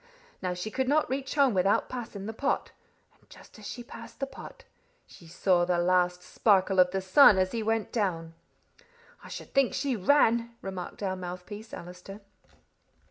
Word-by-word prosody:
Now 180 -1 -2
she 180 +5 -5
could 260 +3 -1
not 290 -1 +2
reach 270 +1 -3
home 275 -5 +4
without 195 +1 +2
passing 230 -5 -7
the 220 - -5
pot, 275 +5 -1 0.5
and - - -31
just - - -16
as 210 - -9
she 240 - -7
passed - - -12
the 275 - -1
pot, 270 - -12 0.4
she 170 - -16
saw 175 +1 +2
the 175 0 +1
last 180 0 +1
sparkle 195 -3 +2
of 180 0 +6
the 190 +1 -2
sun 190 +3 +7
as 185 0 +1
he 230 - -2
went 225 0 -1
down." 170 -7 -2 0.9
"I - - -11
should - - -9
think 275 -2 +2
she 275 -3 -1
ran!" 235 +1 +2
remarked 190 +1 -6
our 190 -1 -1
mouthpiece, 185 +5 -8
Allister. 180 -4 -10
200 Hz, 175 wpm, -28 LUFS, 180-235 Hz, 0.9 s, sun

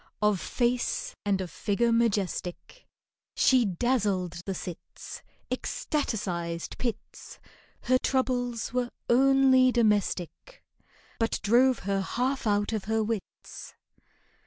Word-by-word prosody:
Of 210 -3 +2
face 240 +7 -1
and 195 -2 +1
of 180 - -6
figure 235 +3 0
majestic, 215 - -1 0.5
She 255 -3 +4
dazzled 190 -4 0
the 195 - -2
cits— 175 -1 -8 0.3
Ecstaticised 175 - -3
pits;— 235 -4 -5 0.5
Her 255 0 +3
troubles 245 -3 -1
were 250 -1 0 0.2
only 265 0 +5
domestic, 210 - 0 0.6
But 225 0 0
drove 245 +4 +4
her 195 0 0
half 250 +5 -1
out 205 +1 +1
of 215 -3 -2
her 220 0 +1
wits. 215 -2 -6
225 Hz, 105 wpm, -28 LUFS, 195-250 Hz, 0.6 s, only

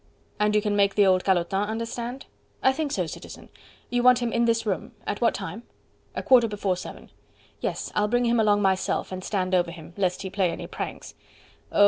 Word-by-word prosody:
"And 210 0 +2
you 210 - +3
can 210 -1 0
make 200 -1 +3
the 205 - +5
old 185 -1 +4
calotin 190 +2 +1
understand?" 235 +3 -4 0.4
"I 265 - +5
think 300 0 -2
so, - - 0
Citizen.... - - -9 0.4
You 245 0 +2
want 250 0 +6
him 240 -2 -2
in 235 - +3
this 230 -1 +1
room.... 195 -3 -2
At 205 - -3
what 235 - +3
time?" 225 - -5 0.5
"A - - -3
quarter 245 -3 +6
before 205 -3 -1
seven." 180 - -9 0.5
"Yes. - - -3
I'll 210 0 +2
bring 245 +3 +2
him 235 0 +3
along 205 -1 +3
myself, 190 0 0
and 185 0 -5
stand 185 -2 -1
over 175 -2 +3
him, 170 0 -10
lest 190 -1 0
he 190 - -5
play 190 -2 +1
any 165 - -5
pranks." - - -6 0.6
"Oh! - - -1
210 Hz, 205 wpm, -26 LUFS, 190-235 Hz, 0.6 s, want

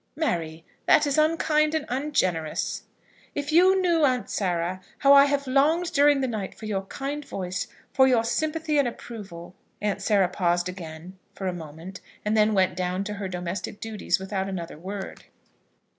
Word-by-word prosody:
"Mary, 165 - -2 0.2
that 300 - +6
is 285 +1 +1
unkind 305 0 +2
and 315 - -1
ungenerous." 185 - -1 0.5
"If 290 +1 -3
you 370 +4 +5
knew, 340 -4 +2
Aunt 255 -3 +1
Sarah, 180 -1 -1 0.2
how 275 +1 +6
I 280 0 +8
have 285 0 0
longed 300 +7 +2
during 285 -1 +5
the 260 - 0
night 215 -5 -4
for 220 - -10
your 195 -2 -2
kind 280 +7 -4
voice, 185 -8 -4 0.3
for 265 0 +5
your 245 -3 +3
sympathy 310 +4 0
and 275 - +3
approval!" 200 -8 -8 0.3
Aunt 205 -1 -1
Sarah 195 -2 +3
paused 175 -1 0
again 180 0 -8 0.2
for 195 - -6
a 185 - 0
moment, 165 +3 -9 0.2
and 210 +1 +1
then 215 0 +3
went 185 -2 +2
down 185 +1 -1
to 210 +1 -4
her 200 -1 -4
domestic 180 +2 -5
duties 215 -5 -1
without 190 0 -3
another 175 -3 -5
word. 195 +3 -7
210 Hz, 170 wpm, -26 LUFS, 185-285 Hz, 0.5 s, I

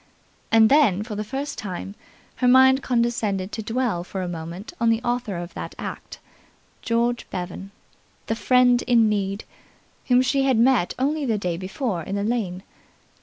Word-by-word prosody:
And 225 -1 +6
then, 235 -8 +4
for 220 -1 -7
the 210 +1 -3
first 275 +6 -5
time, 195 -2 -6 0.4
her 250 - +1
mind 260 +1 +6
condescended 230 -6 -1
to 220 - -4
dwell 225 -5 -1
for 185 +1 -5
a - - -3
moment 170 +3 -7
on 230 - +3
the 225 0 +2
author 240 -6 -2
of 175 0 -7
that - - -7
act, - - -7 0.6
George 235 +1 -1
Bevan, 180 +2 -6 0.6
the - - -1
friend 250 +1 +4
in 235 -3 +5
need, 200 0 -2 0.6
whom 250 0 +4
she 265 +2 +1
had 265 -3 +2
met 235 -5 +3
only 295 +4 0
the 230 -5 0
day 180 -4 -2
before 190 +2 -3
in 195 +5 -5
the 200 - -1
lane. 205 -5 -2
225 Hz, 170 wpm, -23 LUFS, 195-250 Hz, 0.6 s, And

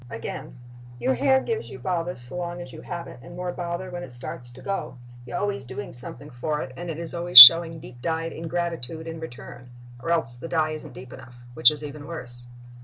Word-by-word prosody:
Again: 115 +2 -8 0.4
Your 125 +2 -1
hair 265 - +2
gives 455 - -5
you - - -10
bother 175 -1 -4
so 120 +5 -13
long 175 0 -5
as 175 - -10
you 155 - -11
have 170 -1 -7
it - - -13
and 175 +6 -13
more 180 0 -5
bother 175 +1 -6
when 175 0 -7
it 130 - -10
starts 125 0 -10
to 130 - -14
go. 195 -9 -5 0.3
You - - -7
are - - -2
always 205 -10 -3
doing 130 +2 -9
something 135 +4 -9
for 150 +5 -4
it 130 0 -10
and 175 +4 -8
it 160 - -6
is 165 -1 -8
always 175 -3 -2
showing 165 +6 +11
deep 120 -4 -14
dyed 165 +2 -3
ingratitude 165 -2 -5
in 165 0 -8
return; 125 -4 -11 0.3
or 145 - -6
else 120 -8 +6
the 165 - -8
dye 155 -2 -1
isn't 155 -3 -9
deep 125 +1 -12
enough, 120 - -14 0.2
which 120 - +5
is 150 -1 -6
even 145 0 -9
worse. 120 -7 -6
160 Hz, 225 wpm, -23 LUFS, 125-170 Hz, 0.4 s, showing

